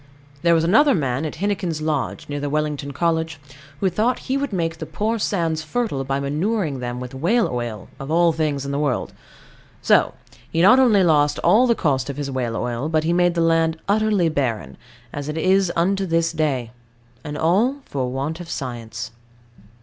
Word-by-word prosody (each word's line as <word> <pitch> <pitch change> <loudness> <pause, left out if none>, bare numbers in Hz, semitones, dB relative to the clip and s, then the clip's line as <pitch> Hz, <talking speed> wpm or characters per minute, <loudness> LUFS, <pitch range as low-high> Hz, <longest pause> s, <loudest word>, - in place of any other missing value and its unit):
There 170 +1 +4
was 160 - +2
another 225 - +5
man 135 -2 -1
at 155 - -4
Hennequin's 190 -3 -2
Lodge, 155 -3 -2
near 145 0 -4
the 145 0 -3
Wellington 150 -1 -2
College, 160 0 -1 0.4
who 195 - +3
thought 225 +7 +1
he 265 - -1
would 275 -2 -1
make 165 -3 -2
the - - -5
poor 220 +2 -1
sands 165 -6 0
fertile 155 - -2
by 135 +1 -1
manuring 155 - -1
them 120 0 -4
with 125 0 -7
whale 185 - +2
oil, 120 -4 -4
of 135 - -7
all 170 +1 +4
things 150 -3 -1
in 140 - -3
the 140 - -1
world. 145 -4 -1 0.7
So - - +3 0.3
he 165 - -2
not 250 +7 +7
only 220 -7 +5
lost 150 -4 +3
all 215 +9 +5
the 235 - +3
cost 140 -8 0
of 140 - -5
his 140 -1 -3
whale 125 -3 -2
oil, 120 +5 -2
but 155 -1 +1
made 175 +1 +2
the 170 - +1
land 165 -1 +2
utterly 210 -3 +2
barren, 115 - -2 0.4
as 145 +1 -5
it 150 - -4
is 185 +2 +3
unto 195 +3 +1
this 165 0 +1
day; 140 -7 -1 0.5
and 150 0 -5
all 200 - +2
for 130 -3 -3
want 140 +6 -3
of 175 -2 -8
science. 115 -3 -5
160 Hz, 190 wpm, -22 LUFS, 140-185 Hz, 0.7 s, not